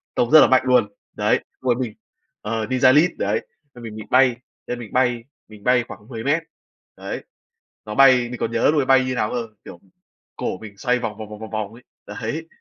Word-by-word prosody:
tông 120 Hz, -, +1 dB
rất 155 Hz, -, +10 dB
là -, -, +7 dB
mạnh 130 Hz, -, +4 dB
luôn. 125 Hz, -5 st, +3 dB, 0.2 s
Đấy, -, -, +1 dB, 0.2 s
lúc 130 Hz, -, +1 dB
ấy -, -, +3 dB
mình 120 Hz, -3 st, -4 dB, 0.5 s
ờ, 110 Hz, +1 st, -2 dB
ninja 130 Hz, +2 st, +4 dB
Lead, 160 Hz, +5 st, +5 dB
đấy, -, -, -1 dB, 0.3 s
nên 120 Hz, -, -12 dB
mình 110 Hz, -2 st, -7 dB
bị 110 Hz, -, -7 dB
bay 130 Hz, -1 st, +4 dB, 0.3 s
nên 125 Hz, -, -4 dB
mình 115 Hz, -4 st, -10 dB
bay, 125 Hz, -2 st, +1 dB, 0.2 s
mình 105 Hz, -2 st, -15 dB
bay 125 Hz, +1 st, +3 dB
khoảng 105 Hz, -, -11 dB
10m, 135 Hz, +7 st, -1 dB, 0.5 s
đấy, -, -, -6 dB, 0.6 s
nó 105 Hz, 0 st, -6 dB
bay 130 Hz, -3 st, +5 dB
mình 125 Hz, -1 st, -7 dB
còn 115 Hz, -, -2 dB
nhớ 115 Hz, +4 st, +3 dB
lúc 155 Hz, -, +2 dB
ấy -, -, -2 dB
bay 130 Hz, 0 st, +4 dB
như 130 Hz, 0 st, -2 dB
nào 105 Hz, -3 st, 0 dB
cơ, 120 Hz, -2 st, -3 dB, 0.2 s
kiểu, 85 Hz, -, -11 dB, 0.6 s
cổ -, -, -3 dB
mình 100 Hz, 0 st, -12 dB
xoay 125 Hz, +3 st, 0 dB
vòng, 110 Hz, -4 st, -4 dB
vòng, 110 Hz, -1 st, -8 dB
vòng, 105 Hz, 0 st, -9 dB
vòng, 110 Hz, 0 st, -9 dB
vòng 110 Hz, -1 st, -4 dB
ấy, 120 Hz, +2 st, -15 dB, 0.2 s
đấy. 115 Hz, +10 st, -5 dB
120 Hz, 225 wpm, -22 LUFS, 110-130 Hz, 0.6 s, rất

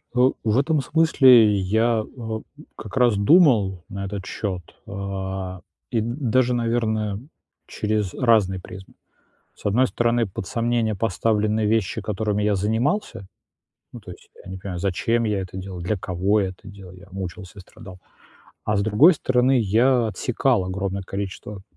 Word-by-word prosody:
Э, 125 Hz, +1 st, +5 dB
в 110 Hz, +1 st, +1 dB
этом 150 Hz, +1 st, +2 dB
смысле 130 Hz, -9 st, +5 dB
я, 110 Hz, +4 st, +1 dB
э, 130 Hz, -, -17 dB
м 110 Hz, -1 st, -5 dB, 0.3 s
как 110 Hz, +3 st, -8 dB
раз 120 Hz, -4 st, +4 dB
думал 100 Hz, -, +4 dB
на 100 Hz, 0 st, -5 dB
этот 100 Hz, 0 st, -6 dB
счёт, 95 Hz, -3 st, -4 dB, 0.3 s
а, 95 Hz, -2 st, -5 dB, 0.3 s
и 115 Hz, -3 st, 0 dB
д 120 Hz, +2 st, -3 dB
даже, 125 Hz, -1 st, +2 dB
наверное, 110 Hz, -3 st, -1 dB, 0.5 s
через 105 Hz, -3 st, -2 dB
разные 105 Hz, -6 st, +2 dB
призмы. 95 Hz, +1 st, -12 dB, 0.6 s
С -, -, -10 dB
одной 120 Hz, +6 st, +3 dB
стороны, 120 Hz, 0 st, +1 dB
под 95 Hz, -1 st, -7 dB
сомнение 115 Hz, 0 st, 0 dB
поставлены 110 Hz, +1 st, 0 dB
вещи, 110 Hz, 0 st, 0 dB
которыми 105 Hz, 0 st, -2 dB
я 105 Hz, 0 st, +2 dB
занимался. 110 Hz, -, -1 dB, 0.7 s
Ну, -, -, -8 dB
то -, -, -11 dB
есть -, -, -15 dB
я -, -, -11 dB
не 95 Hz, -, -6 dB
понимаю, 95 Hz, -1 st, -6 dB
зачем 105 Hz, +6 st, 0 dB
я 105 Hz, -2 st, 0 dB
это 95 Hz, 0 st, -8 dB
делал, 95 Hz, -1 st, -7 dB
для 90 Hz, +5 st, -2 dB
кого 95 Hz, +4 st, 0 dB
я 95 Hz, -, -1 dB
это 95 Hz, +3 st, -13 dB
делал. 100 Hz, -3 st, -12 dB
Я 90 Hz, -, -15 dB
мучился, 95 Hz, +1 st, -7 dB
страдал. 95 Hz, 0 st, -13 dB, 0.7 s
А 105 Hz, -, 0 dB
с 100 Hz, -, +1 dB
другой 110 Hz, -, +6 dB
стороны, 130 Hz, -2 st, +2 dB
я 115 Hz, +3 st, +3 dB
отсекал 120 Hz, -1 st, 0 dB
огромное 95 Hz, +1 st, -3 dB
количество 100 Hz, +1 st, -6 dB
105 Hz, 155 wpm, -23 LUFS, 95-115 Hz, 0.7 s, другой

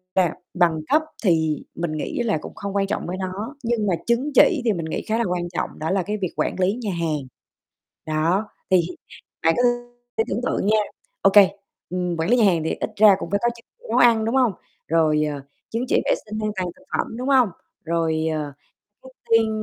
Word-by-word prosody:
là, 180 Hz, -4 st, +3 dB, 0.2 s
bằng 170 Hz, -3 st, +2 dB
cấp 310 Hz, -, +5 dB, 0.2 s
thì 160 Hz, -5 st, +2 dB
mình 170 Hz, -2 st, -2 dB
nghĩ 150 Hz, -, -3 dB
là 215 Hz, -7 st, +1 dB
cũng -, -, -9 dB
không 200 Hz, -2 st, -5 dB
quan 195 Hz, -1 st, +1 dB
trọng 210 Hz, -, -3 dB
với 180 Hz, +2 st, -3 dB
nó, 195 Hz, +8 st, -5 dB
nhưng 230 Hz, -3 st, 0 dB
mà 190 Hz, -, +2 dB
chứng 240 Hz, +5 st, +1 dB
chỉ 325 Hz, -7 st, +6 dB
thì 225 Hz, -, +3 dB
mình 170 Hz, -4 st, -4 dB
nghĩ 160 Hz, -, -3 dB
khá 220 Hz, -, +1 dB
là 235 Hz, -, +1 dB
quan 175 Hz, -1 st, -2 dB
trọng, -, -, -4 dB
đó 160 Hz, +3 st, -2 dB
là 190 Hz, -1 st, +1 dB
cái 210 Hz, +4 st, -3 dB
việc 185 Hz, -4 st, -3 dB
quản -, -, 0 dB
lý 185 Hz, +2 st, +3 dB
nhà 210 Hz, -, -1 dB
hàng. 155 Hz, -5 st, -2 dB, 0.8 s
Đó, 165 Hz, +7 st, +1 dB, 0.2 s
thì 185 Hz, -2 st, +6 dB, 0.6 s
bạn 165 Hz, 0 st, +4 dB
cứ 245 Hz, -, +2 dB, 0.7 s
tưởng 215 Hz, -, -1 dB
tượng 205 Hz, -, 0 dB
nha, 215 Hz, -, +4 dB, 0.4 s
ô -, -, +6 dB
kê, 200 Hz, -3 st, +8 dB, 0.4 s
ừm, 180 Hz, -1 st, -2 dB
quản 160 Hz, +3 st, -1 dB
lý 245 Hz, -, +5 dB
nhà 230 Hz, -, +5 dB
hàng 170 Hz, -5 st, +3 dB
thì 160 Hz, -, -1 dB
ít -, -, -3 dB
ra 210 Hz, -2 st, +7 dB
cũng -, -, -5 dB
phải 200 Hz, -, +2 dB
có 240 Hz, -, +4 dB
chứng 230 Hz, -, -16 dB
chỉ -, -, -19 dB
nấu -, -, +1 dB
ăn, 230 Hz, -2 st, +5 dB
đúng 230 Hz, +4 st, 0 dB
hông? 250 Hz, -6 st, +3 dB, 0.3 s
Rồi, 155 Hz, -2 st, +3 dB
ờ, 145 Hz, -2 st, -4 dB, 0.3 s
chứng 235 Hz, +3 st, -2 dB
chỉ -, -, +3 dB
vệ -, -, +2 dB
sinh 215 Hz, 0 st, -5 dB
an 215 Hz, -, 0 dB
toàn 185 Hz, -1 st, -1 dB
thực 280 Hz, -, -20 dB
phẩm, 225 Hz, -, -3 dB
đúng 250 Hz, +2 st, -4 dB
hông? 260 Hz, -5 st, +5 dB, 0.3 s
Rồi, 160 Hz, -1 st, 0 dB
ờ, 150 Hz, -2 st, -3 dB, 0.5 s
trước 260 Hz, -, -11 dB, 0.2 s
tiên 225 Hz, -1 st, +5 dB
190 Hz, 225 wpm, -23 LUFS, 165-225 Hz, 0.8 s, kê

